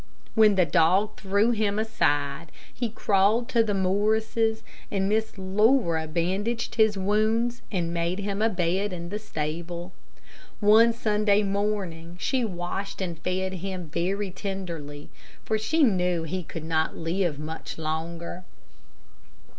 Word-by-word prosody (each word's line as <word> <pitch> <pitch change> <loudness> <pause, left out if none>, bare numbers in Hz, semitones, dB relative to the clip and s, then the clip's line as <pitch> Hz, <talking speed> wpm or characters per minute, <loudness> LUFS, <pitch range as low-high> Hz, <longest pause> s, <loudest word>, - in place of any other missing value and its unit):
When 215 -2 +5
the 185 -2 +4
dog 185 +6 +3
threw 200 +4 +2
him 210 -3 0
aside, 145 -8 0 0.2
he 240 -2 -2
crawled 210 +2 +2
to 235 -3 +4
the 210 -2 -1
Morrises, 220 +3 +1 0.3
and 195 -1 0
Miss 220 +1 0
Laura 190 -4 +2
bandaged 190 +8 -1
his 220 -3 +3
wounds, 220 +5 +1
and 170 -4 -1
made 170 +2 -1
him 200 0 -3
a 225 - +4
bed 185 +1 0
in 170 -1 -6
the 210 +3 -3
stable. 170 -1 -5 0.7
One 220 +3 +6
Sunday 210 -2 +2
morning 195 -4 -2
she 260 +4 0
washed 190 0 -4
and 175 -4 -4
fed 185 +2 -2
him 185 -2 -5
very 195 +3 -1
tenderly, 170 -7 -6 0.3
for 220 0 0
she 310 +9 +2
knew 180 -7 +2
he 180 +3 -3
could 165 -1 -7
not 160 -1 0
live 165 -1 -1
much 155 +2 -6
longer. 165 +3 -4
195 Hz, 135 wpm, -26 LUFS, 170-215 Hz, 0.7 s, One